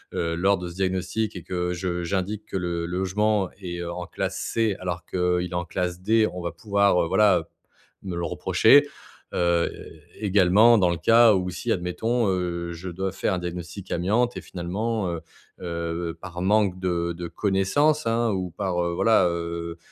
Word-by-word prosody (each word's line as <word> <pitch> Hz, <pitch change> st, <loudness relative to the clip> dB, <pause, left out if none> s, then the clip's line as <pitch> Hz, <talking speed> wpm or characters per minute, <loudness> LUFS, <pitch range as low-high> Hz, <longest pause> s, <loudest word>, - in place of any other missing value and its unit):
heu, 85 Hz, -1 st, -1 dB
lors 95 Hz, +3 st, +2 dB
de 90 Hz, -1 st, -6 dB
ce -, -, -9 dB
diagnostic 95 Hz, +3 st, -1 dB
et 90 Hz, -, -7 dB
que 90 Hz, -1 st, -2 dB
je 90 Hz, 0 st, -3 dB
j'indique 100 Hz, +4 st, -2 dB
que -, -, -3 dB
le 85 Hz, -2 st, -2 dB
logement 95 Hz, +2 st, 0 dB
est, 90 Hz, -2 st, -5 dB
heu, 85 Hz, -, -4 dB
en 90 Hz, 0 st, -6 dB
classe -, -, -3 dB
C 110 Hz, -3 st, 0 dB
alors 90 Hz, -2 st, -4 dB
qu'il 90 Hz, -, -4 dB
est 90 Hz, 0 st, 0 dB
en 90 Hz, 0 st, -2 dB
classe 90 Hz, +1 st, -3 dB
D, 110 Hz, +3 st, +3 dB
on 90 Hz, -, -5 dB
va 85 Hz, 0 st, -3 dB
pouvoir, 100 Hz, +1 st, +2 dB
heu, -, -, -1 dB
voilà, 100 Hz, 0 st, +4 dB
heu, 80 Hz, -, -7 dB, 0.6 s
me 95 Hz, -3 st, -5 dB
le 85 Hz, 0 st, -2 dB
reprocher, 145 Hz, +1 st, +4 dB, 0.5 s
heu, 85 Hz, -1 st, +2 dB, 0.5 s
également 105 Hz, +3 st, +5 dB
dans 90 Hz, -4 st, +3 dB
le 85 Hz, -, -1 dB
cas 115 Hz, +5 st, +6 dB
où 90 Hz, -1 st, 0 dB
si, 115 Hz, +6 st, -3 dB
admettons, 110 Hz, +6 st, 0 dB
heu, 85 Hz, -2 st, -2 dB
je 90 Hz, +2 st, -7 dB
dois 95 Hz, +2 st, -3 dB
faire 95 Hz, -, -1 dB
un 90 Hz, -, -1 dB
diagnostic 90 Hz, +2 st, -7 dB
amiante 110 Hz, +8 st, +1 dB
et -, -, -5 dB
finalement, 100 Hz, +4 st, -3 dB
heu 85 Hz, -1 st, -4 dB, 0.4 s
heu, 85 Hz, -1 st, -3 dB
par 90 Hz, -1 st, -7 dB
manque 100 Hz, -1 st, +2 dB
de 85 Hz, -2 st, -1 dB
de 85 Hz, +1 st, -6 dB
connaissances, 100 Hz, -, +1 dB
hein, 115 Hz, +1 st, +1 dB
ou 95 Hz, -2 st, -2 dB
par, 90 Hz, -1 st, -1 dB
heu, 85 Hz, 0 st, -1 dB
voilà, 110 Hz, -1 st, +4 dB
heu, 85 Hz, 0 st, -4 dB
90 Hz, 185 wpm, -25 LUFS, 85-100 Hz, 0.6 s, cas